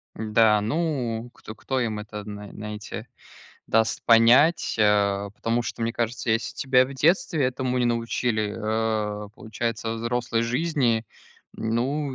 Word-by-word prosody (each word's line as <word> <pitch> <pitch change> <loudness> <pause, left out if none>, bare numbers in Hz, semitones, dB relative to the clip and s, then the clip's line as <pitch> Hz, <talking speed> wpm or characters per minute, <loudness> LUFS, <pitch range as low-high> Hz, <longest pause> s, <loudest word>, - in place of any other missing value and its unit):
Да, 110 0 +3
ну 120 -3 -2
кто 110 - -11
кто 130 +3 -2
им 110 -4 -2
это 105 0 -7
зна 105 -1 -8
знаете 105 +2 -7 0.6
даст 110 0 +1
понять, 125 +9 +5
э, 100 -1 +2
потому 115 +3 -1
что 115 - -5
мне 115 0 0
кажется, 120 0 -2
если 110 0 0
тебя 130 -1 +3
в 135 - -8
детстве 160 0 +2
этому 130 0 -1
не 125 - +2
научили, 115 -2 -1
э, 110 -1 -2
получается 115 0 -3
взрослой 115 0 -1
жизни, 125 -2 0 0.5
ну, 130 +5 -1
115 Hz, 135 wpm, -25 LUFS, 110-125 Hz, 0.6 s, понять